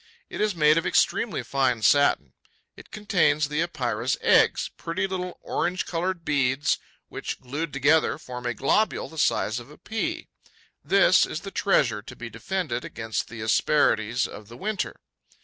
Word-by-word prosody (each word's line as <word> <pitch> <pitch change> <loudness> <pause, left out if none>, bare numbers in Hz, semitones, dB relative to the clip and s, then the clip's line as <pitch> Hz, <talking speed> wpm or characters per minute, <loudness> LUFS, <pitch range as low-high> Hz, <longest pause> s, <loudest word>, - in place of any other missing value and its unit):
It - - -4
is 210 -3 +1
made 155 0 +4
of - - -3
extremely 215 -8 +1
fine 125 -5 0
satin; 105 - +3 0.4
it - - -14
contains 180 -8 +1
the 150 +2 0
Epeira's 125 -8 -1
eggs, - - +3
pretty 170 +3 -2
little 180 -2 -4
orange 180 +2 -1
coloured 175 0 -3
beads, 135 -1 +1 0.3
which, - - -5
glued 145 +5 -4
together, 145 +5 +2
form 125 -4 -7
a 120 - -2
globule 175 - +1
the 160 - -8
size 120 -6 +1
of 120 - -12
a 150 - -14
pea. 315 +10 -4 0.6
This 195 -2 +4
is 155 - -5
the 195 - -8
treasure 120 - +1
to - - -11
be 115 -1 -8
defended 125 - -3
against 110 -1 -4
the 115 -1 -8
asperities 110 0 +2
of 105 0 -9
the 120 - -12
winter. 210 0 -3
150 Hz, 160 wpm, -25 LUFS, 120-180 Hz, 0.6 s, made